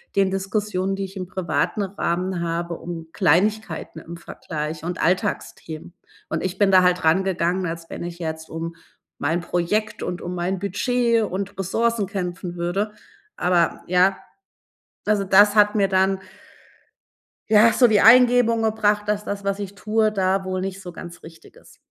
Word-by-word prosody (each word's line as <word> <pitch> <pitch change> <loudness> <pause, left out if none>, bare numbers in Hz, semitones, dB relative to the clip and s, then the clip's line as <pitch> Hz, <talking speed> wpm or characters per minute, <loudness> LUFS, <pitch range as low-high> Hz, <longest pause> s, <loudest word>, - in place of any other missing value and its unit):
den 195 -1 +3
Diskussionen, 195 0 -1
die 195 - -3
ich 195 +1 -11
im 185 - -4
privaten 185 +3 -1
Rahmen 185 -2 -2
habe, 170 0 -2
um 165 -1 -7
Kleinigkeiten 185 0 +1
im 170 +1 -9
Vergleich 155 -2 -6
und 175 +2 -3
Alltagsthemen. 175 -3 -2 0.4
Und - - -2
ich 185 0 -3
bin 205 - +4
da 185 -1 +6
halt 180 -1 +2
rangegangen, 180 +1 +1
als 165 0 -6
wenn - - -6
ich 175 0 -7
jetzt 160 -1 -5
um 165 +1 -5 0.4
mein 165 +5 0
Projekt 210 +5 -1
und 180 0 -4
mein 180 +2 -2
Budget 230 +4 +1
und 200 0 -4
Ressourcen 225 +3 0
kämpfen 180 -2 -5
würde. 195 +5 -2 0.4
Aber, 175 -1 +1
ja, 185 +2 +3 0.9
also, 210 -1 +2
das 205 +2 +6
hat 210 0 +5
mir 200 -2 +3
dann 190 0 +2 1.3
ja, 220 +2 +6
so 245 +3 +5
die 210 -2 +4
Eingebung 240 -1 +6
gebracht, 210 -1 +1
dass 210 0 0
das, 200 -1 -5
was 200 0 -1
ich 200 -1 -6
tue, 215 +1 +1
da 190 -1 0
wohl 185 0 -2
nicht 190 0 -4
so 180 -2 -9
ganz 175 0 -10
richtig 165 0 -15
ist. - - -18
190 Hz, 160 wpm, -22 LUFS, 175-210 Hz, 1.3 s, da